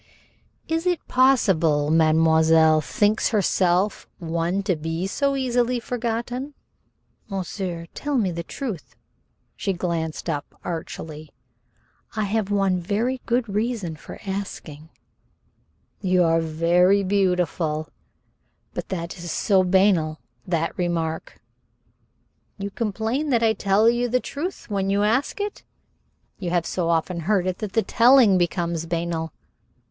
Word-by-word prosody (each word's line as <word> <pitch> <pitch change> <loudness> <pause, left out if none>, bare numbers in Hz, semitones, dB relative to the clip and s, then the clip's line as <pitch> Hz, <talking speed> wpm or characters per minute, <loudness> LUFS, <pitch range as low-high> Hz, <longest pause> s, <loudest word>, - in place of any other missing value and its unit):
"Is 325 +2 -1
it 355 -3 -1
possible 170 - +3
mademoiselle 160 0 +4
thinks 210 +8 +1
herself 190 -2 +1
one 170 +3 -1
to 190 -2 +1
be 165 +3 -3
so 275 +8 0
easily 250 -2 +1
forgotten?" 245 +4 -3 0.7
"Monsieur, 185 -3 -4
tell 290 -1 -2
me 200 -6 +1
the 170 0 -4
truth." 200 - -6 0.6
She 195 - -1
glanced 170 -3 -3
up 145 -3 -4
archly. 160 -2 -6 0.9
"I 215 - 0
have 205 0 -1
one 195 -3 +1
very 225 +8 -1
good 240 0 +1
reason 210 -4 -2
for 150 - -11
asking." 175 -6 -6 1.1
"You 185 -2 +3
are 165 0 +3
very 175 +5 +3
beautiful." 180 -5 0 0.9
"But - - -5
that 170 0 -4
is 170 -1 -5
so 195 -3 +3
banal 180 -4 +2 0.3
that 165 -2 -1
remark." 165 -2 -2 1.2
"You 200 0 -5
complain 225 +7 -2
that 235 -3 +2
I 220 -1 +4
tell 205 +1 +2
you 240 +1 +2
the 250 +2 +2
truth 310 +9 -5
when 195 -2 -1
you 200 +1 +2
ask 230 - +1
it? 410 0 -4 0.8
You 180 -3 -3
have 175 -1 +1
so 175 -2 -1
often 170 +1 0
heard 185 +2 +1
it 185 -1 -2
that 210 -3 -5
the 225 - +2
telling 235 -5 +5
becomes 170 -1 -1
banal? 165 -1 -2
190 Hz, 125 wpm, -23 LUFS, 165-225 Hz, 1.2 s, telling